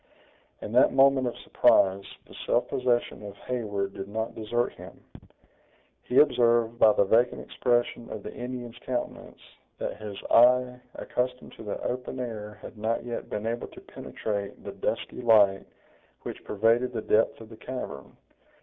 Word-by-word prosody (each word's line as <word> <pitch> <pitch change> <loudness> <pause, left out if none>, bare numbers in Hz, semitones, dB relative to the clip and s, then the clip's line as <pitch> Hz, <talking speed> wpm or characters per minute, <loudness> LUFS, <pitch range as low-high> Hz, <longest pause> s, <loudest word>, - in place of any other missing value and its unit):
In - - -6
that - - +5
moment 135 -1 +5
of 120 - -4
surprise, 95 0 +3 0.2
the - - -16
self - - +2
possession 120 -4 0
of 100 -1 -9
Heyward 100 -6 -3
did 95 0 -6
not 110 +2 -3
desert 120 +2 -1
him. - - -12 1.0
He 125 - -2
observed 120 -4 +4
by 110 -1 +7
the 100 - +3
vacant 115 +5 +2
expression 120 -1 -1
of 105 - -7
the - - -7
Indian's 120 -1 -7
countenance, 125 0 -5 0.4
that - - -4
his 105 -2 -7
eye, 125 +1 +5 0.2
accustomed 125 0 -3
to - - -10
the 105 - -4
open 125 +1 -4
air 105 -4 -5
had 110 - -10
not 110 +2 -1
yet 120 -1 -5
been 105 - -4
able 115 +1 -2
to - - -13
penetrate 100 -2 -5
the - - -6
dusky - - -3
light 105 -5 +4 0.6
which - - -7
pervaded 115 +4 +2
the 110 - -3
depth 110 +1 +2
of 110 -1 -12
the 110 - -12
cavern. 125 - -7
115 Hz, 160 wpm, -27 LUFS, 105-125 Hz, 1.0 s, by